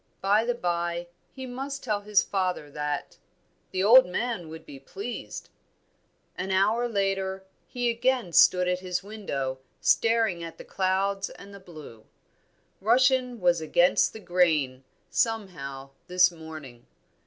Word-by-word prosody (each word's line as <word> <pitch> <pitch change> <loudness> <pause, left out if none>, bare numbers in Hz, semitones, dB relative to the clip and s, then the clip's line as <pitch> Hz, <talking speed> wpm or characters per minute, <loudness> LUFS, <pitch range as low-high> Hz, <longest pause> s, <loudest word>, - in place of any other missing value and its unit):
By 205 +3 +2
the 245 0 0
bye, 175 -4 -2 0.2
he 260 -1 -8
must 270 +2 -6
tell 210 -4 -1
his 205 -1 +3
father 185 -6 -2
that; 150 0 -4 0.5
the 185 - -1
old 245 +4 +8
man 180 -3 -3
would 160 0 -10
be 140 -2 -11
pleased. 200 - -7 0.9
An 185 +1 -4
hour 215 +6 +2
later, 195 -2 -1 0.2
he 245 -1 -2
again 235 -5 0
stood 180 +2 +6
at 180 0 0
his 180 0 -3
window, 140 -11 -4 0.2
staring 225 -7 +2
at 165 - -8
the - - -11
clouds 195 +1 0
and 200 0 -13
the 200 - -10
blue. 155 - -13 0.8
Russian 250 +2 +3
was 175 -3 +2
against 175 +3 +3
the 220 - -10
grain, 160 -9 +1 0.3
somehow, 145 - -2 0.2
this 180 0 +4
morning. 155 -7 -11
190 Hz, 135 wpm, -27 LUFS, 170-220 Hz, 0.9 s, old